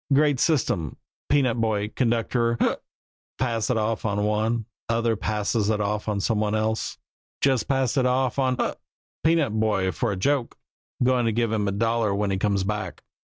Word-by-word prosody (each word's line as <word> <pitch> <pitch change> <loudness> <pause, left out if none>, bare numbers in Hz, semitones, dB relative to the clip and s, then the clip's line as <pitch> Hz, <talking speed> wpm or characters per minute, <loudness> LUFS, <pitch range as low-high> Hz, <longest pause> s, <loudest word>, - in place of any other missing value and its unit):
Great 145 -1 +4
system 105 - +1 0.3
peanut 130 -5 +2
boy 105 -2 0
conductor 115 0 0
hic! - - +1 0.6
Pass 115 -4 -1
it 125 - +2
off 110 0 -1
on 105 -1 0
one 110 +2 0 0.2
other 115 0 +1
passes 105 0 -1
it 110 -1 +1
off 105 +1 -2
on 105 -1 -1
some 110 +2 0
one 105 0 0
else. 110 +1 -1 0.4
Just 130 -5 +2
passed 135 0 +1
it 130 -1 +3
off 130 0 +1
on 130 -1 +1
hic! - - -2 0.4
peanut 160 -7 +2
boy 100 -4 +1
for 90 +7 -1
a - - -2
joke. 135 +5 0 0.5
Goin' 125 -1 +3
to 115 - +2
give 115 0 0
him 105 -2 0
a - - +1
dollar 115 0 +1
when 100 -1 0
he 95 - 0
comes 100 -1 +1
back." 105 +2 -4
115 Hz, 180 wpm, -25 LUFS, 105-125 Hz, 0.6 s, Great